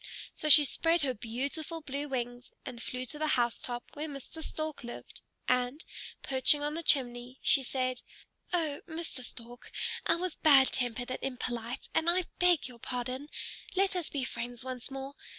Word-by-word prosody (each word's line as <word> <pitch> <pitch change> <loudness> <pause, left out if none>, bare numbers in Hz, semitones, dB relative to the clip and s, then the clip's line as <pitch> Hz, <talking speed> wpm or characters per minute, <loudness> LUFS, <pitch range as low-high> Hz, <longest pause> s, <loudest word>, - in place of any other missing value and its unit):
So 305 - -2
she 295 0 +10
spread 330 +4 +2
her 260 -2 +1
beautiful 275 +9 -3
blue 285 0 -3
wings 245 -2 -3 0.2
and 235 -2 -6
flew 255 +1 -3
to 295 +4 -4
the 310 - +1
housetop 240 0 0
where 300 +2 -4
Mr. 285 +2 -7
Stork 310 -3 -4
lived, 240 - -9 0.3
and, 250 +5 +1 0.4
perching 270 +2 +4
on 295 +1 0
the 330 - -3
chimney, 250 -4 +3
she 275 - +5
said, 255 -1 -1 0.5
"Oh, 315 -5 0
Mr. 320 -5 -4
Stork, 240 0 -10 0.4
I - - +5
was 360 0 -3
bad 275 -4 +7
tempered 245 0 -1
and - - -2
impolite, 245 -1 -3
and 325 - +3
I 365 +2 +4 0.2
beg 355 -5 +5
your 245 -2 -11
pardon. 255 +4 -4 0.5
Let 390 +1 +3
us 355 -3 -1
be 280 -3 -2
friends 240 -1 -4
once 255 -1 -5
more. 270 0 -6
265 Hz, 170 wpm, -31 LUFS, 245-310 Hz, 0.5 s, she